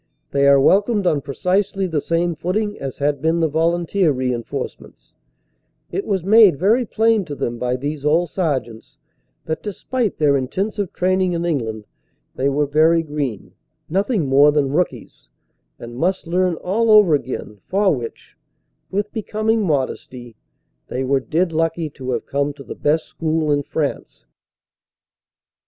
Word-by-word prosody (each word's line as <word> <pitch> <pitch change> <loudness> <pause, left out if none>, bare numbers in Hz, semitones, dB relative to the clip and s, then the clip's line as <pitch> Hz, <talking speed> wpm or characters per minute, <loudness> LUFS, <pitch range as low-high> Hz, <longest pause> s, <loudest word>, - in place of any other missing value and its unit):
They 140 0 +3
are 140 0 +6
welcomed 200 - +3
on 150 -5 +2
precisely 185 +7 -1
the 160 -5 -1
same 170 +2 0
footing 205 +6 -2
as 135 -1 -5
had 145 -1 0
been 160 +2 +1
the 165 - +2
volunteer 170 +3 +1
reinforce 130 0 -3
ments - - -19 0.8
it 395 - -3
was 190 -4 0
made 205 -4 +6
very 220 - +2
plain 225 -1 +2
to 145 - -6
them 120 -3 -3
by 125 +1 0
these 145 +2 -4
old 160 +3 +2
Sergeants 130 - -3 0.5
that 160 0 -3
despite 220 +2 -3
their 145 -2 +3
intensive 190 +9 -2
training 185 0 +1
in 170 0 -2
England 110 -10 -2 0.5
they 135 +2 0
were 145 +2 +1
very 160 +3 +3
green, 145 -9 -4 0.4
nothing 195 - 0
more 140 +2 +5
than 145 -2 +1
rookies, 180 +3 -3 0.5
and 120 0 -9
must 185 +7 0
learn 180 +1 +1
all 220 +7 0
over 210 -6 +6
again 130 -7 -3
for 195 -1 +2
which 120 -3 -8 0.5
(with 205 +2 -2
becoming 220 +1 0
modesty) 130 - -3 0.5
they 130 - -3
were 135 +1 +2
dead 165 +6 -1
lucky 165 -1 -1
to 130 -2 -8
have 120 - -3
come 140 +1 -1
to 140 -1 -12
the - - -7
best 155 +2 0
school 160 -1 -1
in 145 0 +2
France. 145 +1 -4
160 Hz, 150 wpm, -20 LUFS, 140-190 Hz, 0.8 s, are